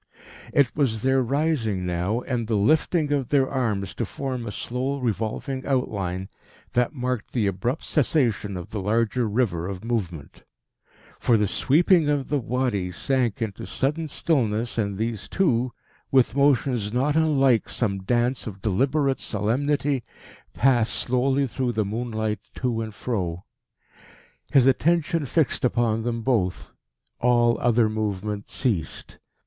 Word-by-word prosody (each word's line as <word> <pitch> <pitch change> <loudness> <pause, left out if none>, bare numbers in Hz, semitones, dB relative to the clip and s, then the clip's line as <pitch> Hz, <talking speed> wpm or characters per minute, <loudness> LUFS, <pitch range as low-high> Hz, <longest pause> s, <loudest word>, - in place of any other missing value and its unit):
It 130 -6 +2
was 115 -7 0
their 130 0 +3
rising 125 - 0
now, 90 +6 -1
and 120 -4 -2
the 110 - 0
lifting 150 - +2
of 140 -4 0
their 135 -2 +3
arms 105 -9 -1
to 110 - -3
form 125 +1 -4
a - - -3
slow 130 +6 -3
revolving 125 +2 -2
outline, 95 -9 -1 0.5
that 125 +5 +1
marked 125 -4 -3
the 115 -5 +1
abrupt 100 - -2
cessation 120 - +1
of 90 - -8
the 105 - -3
larger 115 +3 +1
river 100 -7 0
of 95 0 -6
movement; 90 -11 -4 0.8
for 115 - +3
the 105 -1 +2
sweeping 160 - +3
of 145 -2 0
the 145 - +1
Wadi 120 -7 -1
sank 120 +3 0
into 105 -3 -5
sudden 150 +4 -1
stillness, 120 -8 0
and 100 -2 -1
these 110 -1 -3
two, 130 -10 +1 0.4
with 130 -2 +3
motions 135 -6 +2
not 135 +5 +1
unlike 135 -7 +3
some 100 -5 -1
dance 120 +5 0
of 100 -3 -7
deliberate 135 +7 +1
solemnity, 135 +5 0 0.5
passed 120 -4 +3
slowly 130 +2 +1
through 125 0 -2
the 110 -2 0
moonlight 110 0 -2 0.2
to 120 -3 -1
and 110 -2 -6
fro. 90 -8 -3 1.1
His 135 -3 +5
attention 160 +3 +2
fixed 155 +1 +1
upon 120 -3 +1
them 115 0 -2
both. 110 -9 0 0.5
All 120 -1 +3
other 120 -2 +3
movement 105 -1 -3
ceased. 100 - -2
120 Hz, 140 wpm, -24 LUFS, 105-135 Hz, 1.1 s, His